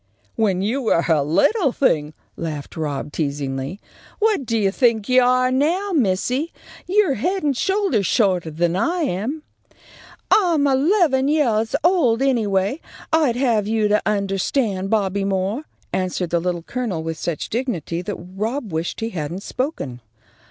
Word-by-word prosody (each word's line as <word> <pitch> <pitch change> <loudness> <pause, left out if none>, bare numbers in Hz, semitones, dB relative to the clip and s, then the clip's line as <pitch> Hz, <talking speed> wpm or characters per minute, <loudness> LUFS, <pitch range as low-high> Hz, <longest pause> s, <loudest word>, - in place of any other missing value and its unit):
"When 195 -4 +1
you 240 +7 0
were 195 -8 +2
a 160 -3 +3
little 245 - +2
thing!" 155 - +1 0.2
laughed 155 -4 -5
Rob, 150 -2 -3
teasingly. 140 +2 -3 0.4
"What 420 - +1
do 230 - +1
you 200 -3 +2
think 225 -2 +2
you 255 0 +5
are 255 +1 +3
now, 335 +10 +1
missy? 250 - +1 0.4
You're 380 -5 +3
head 360 - -1
and 285 -2 +1
shoulders 380 - +1
shorter 185 -7 +2
than 170 +2 0
I 340 - 0
am." 275 - -2 0.9
"I'm 340 -8 +4
eleven 280 0 +3
yeahs 235 -7 +1
old, 280 -9 +3
anyway, 220 - +1 0.3
I'd 305 -7 +3
have 235 -5 +1
you 220 -1 +1
to 210 +1 +3
undahstand, 195 0 0
Bobby 200 -2 +1
Moore," 195 +8 -1 0.3
answered 185 -2 -1
the 170 - +2
Little 175 -1 -2
Colonel, 215 -8 -3
with 160 -1 -4
such 170 -4 -3
dignity 210 - -2
that 195 +2 -4
Rob 210 - -4
wished 165 +7 -3
he 225 - -1
hadn't 170 +2 -4
spoken. 220 - -4
220 Hz, 145 wpm, -21 LUFS, 180-275 Hz, 0.9 s, you